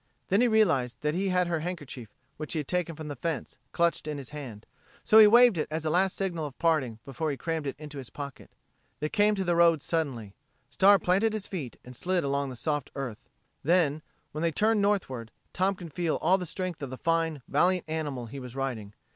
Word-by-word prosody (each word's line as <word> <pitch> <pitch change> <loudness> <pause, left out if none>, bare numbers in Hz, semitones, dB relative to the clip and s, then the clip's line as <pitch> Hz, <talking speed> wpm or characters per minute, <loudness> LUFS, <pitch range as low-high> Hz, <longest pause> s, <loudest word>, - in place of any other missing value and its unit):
Then 195 +4 +4
he 250 - +5
realized 160 - +2
that 150 0 0
he 190 +3 0
had 180 -1 +2
her 170 -2 -1
handkerchief, 145 - -6 0.3
which 155 - -4
he - - -2
had 140 - -10
taken 180 -2 -1
from 155 0 -7
the 145 - -5
fence, 155 0 -4
clutched 170 -2 +1
in 150 -1 -3
his 135 -3 -7
hand, 130 -8 -8 0.4
so 220 - +7
he 215 - +10
waved 235 -4 +6
it - - -1
as 160 +1 -3
a 155 - +1
last 185 +3 +2
signal 170 -6 -2
of 135 - -12
parting 155 -9 +1
before 140 +3 -3
he 140 - -3
crammed 160 -2 -3
it 135 - -3
in 150 0 -9
his 135 -4 -7
pocket. 140 -2 -8 0.5
They 150 - -2
came 210 +2 +3
to 195 - -1
the 175 -2 +1
road 170 -2 +5
suddenly; 135 - -2 0.4
Star 200 +1 +6
planted 195 +5 +2
his 215 -2 -3
feet 150 - -6
and 125 0 -10
slid 180 +3 0
on 140 0 0
the 130 - -7
soft 145 +2 -2
earth. 130 -6 -6 0.3
Then, 155 -2 +2 0.3
when 155 - -5
they 165 0 +2
turned 215 +5 +2
northward, 155 - 0 0.2
Tom 190 +2 +1
could 170 -4 -10
feel 170 -1 0
all 190 +2 +3
the 180 - -5
strength 180 0 -4
of 140 - -4
the 130 - -7
fine, 165 -3 0
valiant 180 0 +2
animal 150 -6 -3
he 135 +5 -8
was 125 -1 -9
riding. 120 -7 -4
160 Hz, 220 wpm, -28 LUFS, 140-180 Hz, 0.5 s, he